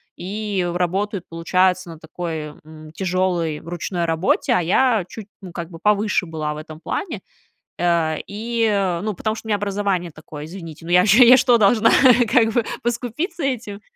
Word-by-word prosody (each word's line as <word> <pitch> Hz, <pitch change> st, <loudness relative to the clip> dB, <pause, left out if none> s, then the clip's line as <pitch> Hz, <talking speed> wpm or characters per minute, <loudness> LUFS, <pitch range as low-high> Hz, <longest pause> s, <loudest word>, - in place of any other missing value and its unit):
и 200 Hz, -1 st, -3 dB
работают, 185 Hz, +2 st, -1 dB
получается, 180 Hz, +2 st, +1 dB
на 165 Hz, -2 st, -10 dB
такой, 160 Hz, -2 st, -6 dB
м, 155 Hz, 0 st, -13 dB
тяжелой 175 Hz, -3 st, -1 dB
ручной 175 Hz, +1 st, -4 dB
работе, 165 Hz, +3 st, +1 dB
а 180 Hz, -, +2 dB
я 210 Hz, +3 st, +2 dB
чуть, 220 Hz, -, -9 dB, 0.2 s
ну, 185 Hz, -2 st, -9 dB
как 170 Hz, -1 st, -6 dB
бы, 165 Hz, -, -9 dB
повыше 210 Hz, 0 st, +1 dB
была 155 Hz, -2 st, -3 dB
в -, -, -8 dB
этом 155 Hz, 0 st, -10 dB
плане, 335 Hz, -, -4 dB, 0.6 s
э, 170 Hz, -2 st, +1 dB
и, 210 Hz, -4 st, -1 dB
ну, 215 Hz, 0 st, -2 dB
потому 215 Hz, +4 st, -2 dB
что 225 Hz, -, -10 dB
у -, -, -7 dB
меня 210 Hz, -, +2 dB
образование 200 Hz, -3 st, -2 dB
такое, 150 Hz, -1 st, -10 dB
извините, 165 Hz, -2 st, -10 dB
ну, -, -, -6 dB
я 180 Hz, 0 st, +6 dB, 0.3 s
что, 245 Hz, -2 st, +4 dB
должна, 220 Hz, +2 st, +4 dB, 0.4 s
как 225 Hz, -3 st, +4 dB
бы, 240 Hz, +1 st, +2 dB, 0.2 s
поскупиться 250 Hz, -, -3 dB
этим? 235 Hz, -7 st, -3 dB
185 Hz, 165 wpm, -21 LUFS, 165-215 Hz, 0.6 s, я